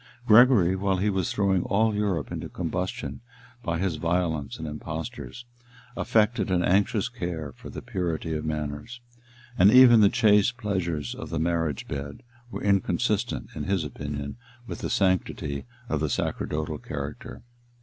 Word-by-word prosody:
Gregory, 110 -6 +6
while 95 0 0
he 105 +3 +1
was 95 -3 -1
throwing 95 -3 +2
all 110 +2 +2
Europe 100 -9 -1
into - - -5
combustion 90 +7 -4 0.4
by 85 -6 -2
his 90 -3 -1
violence 85 -3 -1
and 80 0 -6
impostures, 80 +11 -6 0.5
affected 110 0 +1
an 90 -1 +2
anxious 100 +4 +2
care 85 - -5
for - - -12
the - - -8
purity 85 -2 -2
of 75 -1 -3
manners; 75 +10 -4 0.6
and 95 +3 +8
even 120 -1 +8
the 100 - +7
chaste 110 0 +3
pleasures 85 - -2
of - - -8
the 80 - -3
marriage 80 -3 -1
bed 70 - -6 0.3
were - - -6
inconsistent, 100 -2 0
in - - -5
his 95 -3 0
opinion, 70 +2 -5 0.3
with - - -6
the - - -3
sanctity 80 -7 0 0.2
of - - -1
the - - 0
sacerdotal 75 0 -2
character. - - -7
90 Hz, 150 wpm, -26 LUFS, 80-105 Hz, 0.6 s, and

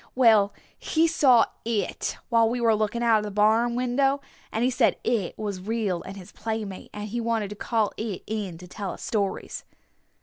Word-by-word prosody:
"Well, 220 -5 +5 0.3
he 320 +1 +2
saw 270 -8 +5 0.2
It 225 -2 -2
while 230 -2 +4
we 245 +1 -1
were 230 -2 +4
looking 215 +2 0
out 225 -2 +5
of - - -4
the 210 - -4
barn 220 +4 +3
window! 270 +3 +1 0.3
And 225 - -1
he 255 - +3
said 250 - +2
It 220 -7 -1
was 205 -3 -4
real 205 -4 -1
and 195 +1 -9
his 185 -2 -11
playmate, 220 -4 -5
and 210 0 -6
he 235 +3 -3
wanted 225 -3 -1
to - - -5
call 220 0 0
It 215 -4 -4
in 205 -6 -4
to 180 +2 -11
tell 195 +1 -5
us - - -10
stories!" 200 -3 -2
220 Hz, 195 wpm, -26 LUFS, 205-235 Hz, 0.3 s, Well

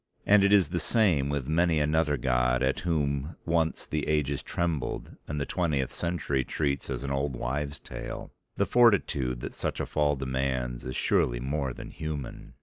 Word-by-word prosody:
And 105 -1 +6
it 100 - +4
is 95 -7 +5
the - - -1
same 85 -12 +2
with 70 -3 -2
many 80 +1 +2
another 75 0 +2
god 60 0 +1
at 65 0 +1
whom 75 -2 -1
once 80 -1 +1
the 75 -1 -2
ages 75 -2 +1
trembled 80 -6 -2
and 75 0 -3
the 70 - -1
twentieth 75 -8 -1
century 85 -6 -1
treats 70 0 -2
as 65 -1 -3
an 70 - -3
old 70 -1 -1
wives' 70 +5 -3
tale. - - -7 0.3
The - - +3
fortitude 75 - +3
that - - -5
such - - -3
a - - -1
fall 75 -1 +1
demands 65 -2 -2
is 65 0 -4
surely - - +2
more 70 +1 -2
than - - -9
human. 75 -4 -6
70 Hz, 175 wpm, -28 LUFS, 65-80 Hz, 0.3 s, And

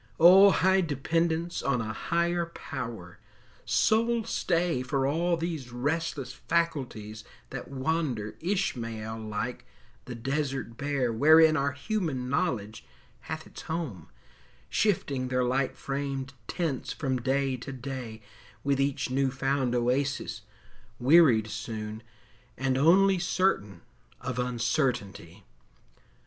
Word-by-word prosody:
O, 190 +4 +9
high 190 0 +3
dependence 165 +2 -1
on 140 -3 +1
a 110 -1 -3
higher 170 +5 0
Power, 115 - -7 0.5
Sole 220 - +2
stay 170 - 0
for 135 +1 0
all 170 +5 +1
these 160 -7 -4
restless 145 +2 -2
faculties 125 -11 -2 0.3
That - - -6
wander, 130 -6 -1
Ishmael 115 - -2
like, 110 +3 -4 0.4
the 125 - -6
desert 135 -1 -2
bare 135 -3 -1
Wherein 155 +5 +6
our 140 -2 0
human 145 -4 -2
knowledge 120 - -1 0.5
hath - - -4
its - - -10
home, 155 - -5 0.6
Shifting 140 -11 +1
their 125 0 +1
light 130 +1 0
framed 135 -1 -3
tents 160 -8 -2
from 135 -3 -1
day 135 +1 +1
to 125 +3 -7
day, 125 -4 -6 0.4
With 140 -1 +1
each 135 -2 -1
new 135 +1 +2
found 135 -1 0
oasis, 130 +3 0 0.6
wearied 130 -5 +6
soon, 110 0 -5 0.6
And 130 -1 0
only 185 +7 +5
certain 175 - 0 0.4
of 125 -1 -4
uncertainty! 120 - -1
135 Hz, 110 wpm, -28 LUFS, 120-165 Hz, 0.6 s, O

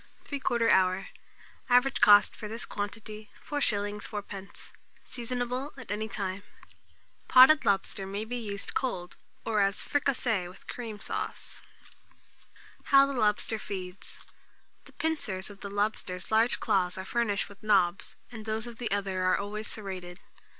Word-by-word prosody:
Time. 285 - -3
3/4 235 -3 +2
hour. 185 +1 +3 0.6
Average 250 +2 +4
cost 205 0 +7
for 210 - -7
this 225 +3 -6
quantity, 210 +1 -6 0.2
4s. 210 -8 0
4d. 200 -2 -8 0.3
Seasonable 250 +3 -3
at 250 -5 -8
any 215 +1 -2
time. 195 -2 -3 0.2
Note. - - -19 0.5
Potted 265 +4 +8
lobster 195 0 0
may 200 +3 -3
be 245 +3 -4
used 205 -4 -5
cold, 180 - -2 0.3
or 220 -2 +1
as 195 0 +1
fricassee 245 -9 0
with 180 - -14
cream 225 -4 -6
sauce. - - -4 1.2
How 275 0 +7
the 280 - -3
Lobster 215 -2 +1
Feeds. 185 -3 -7 0.7
The - - -17
pincers 215 -12 -2
of 200 - -13
the 200 - -6
lobster's 200 -3 -2
large 225 +3 +4
claws 190 -5 +1
are 190 - -5
furnished 220 -2 0
with 200 - -15
nobs, 195 -4 +2 0.2
and 220 -3 -8
those 220 +1 -1
of 235 -1 -9
the 240 - -2
other, 195 -2 -1
are 185 - +4
always 210 +2 -4
serrated. 185 -4 -5
210 Hz, 145 wpm, -29 LUFS, 195-235 Hz, 1.2 s, Potted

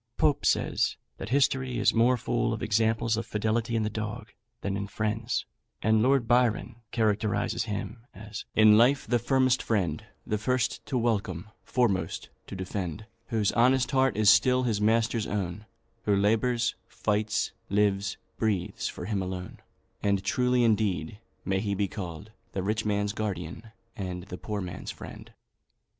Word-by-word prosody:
Pope - - +2
says, - - +1 0.2
that 95 - -5
history 130 -1 +2
is 110 - +3
more 120 +2 +4
full 120 0 0
of 110 - -4
examples 110 0 +2
of 115 - -2
fidelity 110 +2 0
in 110 - +1
the 105 - 0
dog 110 +1 -5 0.3
than 100 -1 -2
in 100 0 -3
friends; 110 +3 -2 0.4
and 110 0 +4
Lord 130 -1 +3
Byron 120 -1 +2
characterises 110 0 0
him 115 +3 -5
as 105 +1 -8
"in 110 0 +7
life 130 +4 +4
the 120 +1 +2
firmest 130 +1 +2
friend, 90 -9 0 0.2
The 105 - -1
first 125 +2 0
to 130 - -1
welcome, 105 -5 -1
foremost 95 -9 0 0.2
to - - -7
defend; 95 +1 -4 0.2
Whose 110 -4 +1
honest 130 +3 +3
heart 135 -4 +2
is 110 -1 +7
still 130 0 +4
his 110 -4 0
master's 110 0 +2
own; 105 +1 -3 0.4
Who 105 - +3
labours, 115 +4 +2
fights, 105 0 0 0.2
lives, 100 -1 +1 0.2
breathes 105 -6 -1
for - - -6
him 100 -1 -1
alone;" 90 -1 -5 0.4
and 100 -1 +1
truly 125 +4 +2
indeed 105 -5 +1 0.3
may 95 0 +1
he 100 -1 -1
be 100 0 0
called 95 0 -7 0.2
"The 95 - -2
rich 110 +3 -1
man's 105 -1 0
guardian, 105 -1 -4 0.3
and 90 -4 -4
the 90 -1 -8
poor 105 -2 -3
man's 90 -1 -6
friend." - - -9
110 Hz, 155 wpm, -28 LUFS, 100-115 Hz, 0.4 s, in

